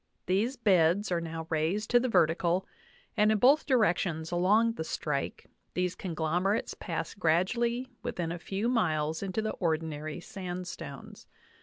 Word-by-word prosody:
These 210 +9 +1
beds 190 -2 +3
are 170 -1 +1
now 165 -1 -5
raised 165 +8 0
to 245 - +6
the 255 +1 -1
vertical, 170 -1 +2 0.5
and 215 -1 +4
in 215 - +3
both 275 +8 +5
directions 180 - +1
along 205 +7 +3
the 160 - -4
strike 150 -3 -3 0.3
these 180 0 0
conglomerates 175 +4 -1
pass 165 -1 -4
gradually 235 +9 +1
within 170 -5 -3
a 170 - -4
few 195 +6 -2
miles 160 -10 +1
into 200 +2 -2
the 215 - -1
ordinary 155 -2 -2
sandstones. 180 -1 -7
180 Hz, 140 wpm, -30 LUFS, 165-215 Hz, 0.5 s, to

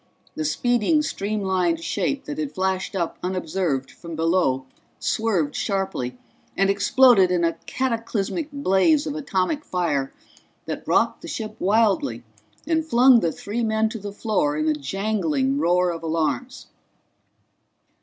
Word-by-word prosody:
The 155 - -3
speeding 245 - +2
streamlined 190 - -1
shape 280 +8 -1
that 295 +1 -5
had 300 -3 -4
flashed 190 +1 -1
up 170 -3 -2
unobserved 175 -6 -2
from 170 -1 -9
below 160 -5 +1 0.3
swerved 190 -10 0
sharply 190 -11 -2 0.4
and 195 +1 +3
exploded 200 -1 +5
in 180 -1 +1
a 165 0 +2
cataclysmic 240 - -2
blaze 285 - +2
of 295 - -3
atomic 285 -1 -1
fire 150 - -1 0.5
that - - -6
rocked - - +2
the - - -9
ship 215 -1 -5
wildly 195 - +2 0.4
and 320 0 +1
flung 255 -4 +6
the 170 -6 0
three 220 +8 -4
men 220 0 +1
to 225 0 -6
the 205 0 -6
floor 200 -9 0
in 155 0 0
a 155 - +3
jangling 150 -4 -1
roar 175 +2 +2
of 165 - -6
alarms. 165 - -2
195 Hz, 135 wpm, -23 LUFS, 165-230 Hz, 0.5 s, flung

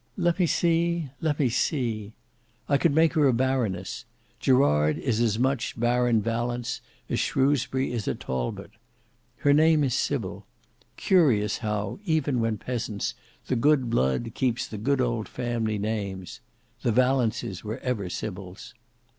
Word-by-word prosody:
"Let 175 -1 +1
me 180 - +4
see—let 165 -4 0
me 135 -4 +3
see. 115 - -1 0.5
I 140 - +3
could 170 - +3
make 160 -1 +4
her 150 -4 +4
a 130 - +3
baroness. 115 -7 -1 0.3
Gerard 75 - +3
is 120 -5 -1
as 115 -3 +2
much 130 -1 -1
Baron 120 -2 +2
Valence 120 +1 -2 0.3
as - - -1
Shrewsbury 135 -1 +1
is 115 -4 -3
a - - 0
Talbot. 65 - -4 0.7
Her 145 - +6
name 155 0 +5
is 130 -3 +1
Sybil. 130 -6 -2 0.5
Curious 125 - +3
how, 105 - -3
even 155 -8 +1
when 115 -1 0
peasants, 115 -2 -3 0.3
the 130 - -1
good 130 -1 +2
blood 115 - +1
keeps 125 -3 0
the 105 - -7
good 140 +4 +1
old 120 -3 -1
family 120 -3 -2
names! 100 -3 -4 0.4
The 120 - +1
Valences 120 -5 +1
were 110 +2 -4
ever 120 -8 -3
Sybils. 95 -2 -7
120 Hz, 140 wpm, -26 LUFS, 110-140 Hz, 0.7 s, Her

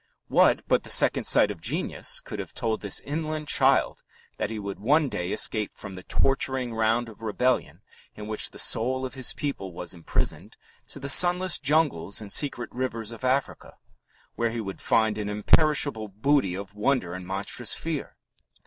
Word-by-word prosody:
What - - +3
but - - +2
the - - -7
second - - +5
sight - - +4
of - - -10
genius - - -1
could - - -8
have - - -7
told 110 -2 -2
this 100 -2 +1
inland 155 0 -4
child - - +2 0.4
that - - -2
he 110 - -5
would 100 -2 -6
one 145 +7 +2
day 90 -4 -4
escape 110 -1 +1
from 100 -2 -9
the 95 - -9
torturing 130 +2 0
round 115 +2 +1
of 115 -1 -13
rebellion 125 +4 -1 0.3
in 105 - -8
which 110 0 -2
the - - -14
soul 130 +3 +2
of 130 - -6
his 130 -2 0
people 135 -10 -4
was 90 +2 -5
imprisoned 85 -2 -3 0.3
to - - -8
the 140 - -5
sunless 180 +3 +5
jungles 140 - +1
and 105 -2 -4
secret 130 -5 0
rivers 115 -3 -3
of 115 +1 -11
Africa, 130 +2 -2 0.6
where 115 0 -1
he 115 +1 -4
would 95 -3 -6
find 110 -1 +1
an 105 -1 -3
imperishable 110 +2 +2
booty 105 -1 +1
of 100 +1 -8
wonder 105 -4 0
and 90 0 -8
monstrous 100 +5 -1
fear? 160 -3 -5
115 Hz, 175 wpm, -26 LUFS, 105-140 Hz, 0.6 s, second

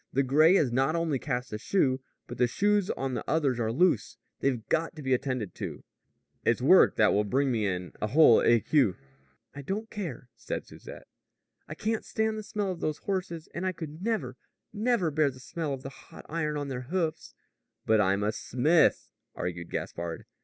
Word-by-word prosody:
"The 135 - +2
gray 155 +7 +5
has 145 -10 +3
not 135 +6 +1
only 165 -5 0
cast 125 -4 -3
a 105 - -3
shoe, 130 - +1 0.2
but 120 -1 -9
the 125 - +4
shoes 205 +7 +1
on 135 -1 -2
the - - -3
others 140 -6 +1
are 110 -1 0
loose. 135 - +1 0.2
They've 125 -5 -1
got 165 +1 0
to 150 - -8
be 130 -1 +1
attended 125 -6 -2
to. - - -6 0.6
It's - - +2
work - - +6
that - - +4
will 105 - +2
bring 135 +6 +1
me 110 -4 0
in 90 -1 -3
a 105 - 0
whole 135 0 +6
écu." 120 -2 +3 0.6
"I 140 - -7
don't 205 +10 -4
care," 165 - -6
said - - -5
Susette. - - -12 0.6
"I - - -6
can't 220 +1 -2
stand 220 0 -1
the 215 - -4
smell 205 -2 -3
of 175 - -6
those 155 -1 -2
horses, 180 -4 -4
and 170 - -4
I 185 0 0
could 160 -1 -8
never, 175 - -2 0.4
never 215 -6 +1
bear 150 0 +2
the 130 -1 -11
smell 155 +3 -4
of 135 -1 -5
the 135 - -5
hot 140 - -14
iron 155 -2 -2
on 145 -1 -4
their 125 -1 -5
hoofs." 160 -3 -2 0.5
"But 110 -1 +4
I'm 100 +1 +1
a 105 - +1
smith," 140 +9 +2 0.3
argued 85 -1 -4
Gaspard. 85 -1 -5
140 Hz, 195 wpm, -28 LUFS, 120-170 Hz, 0.6 s, work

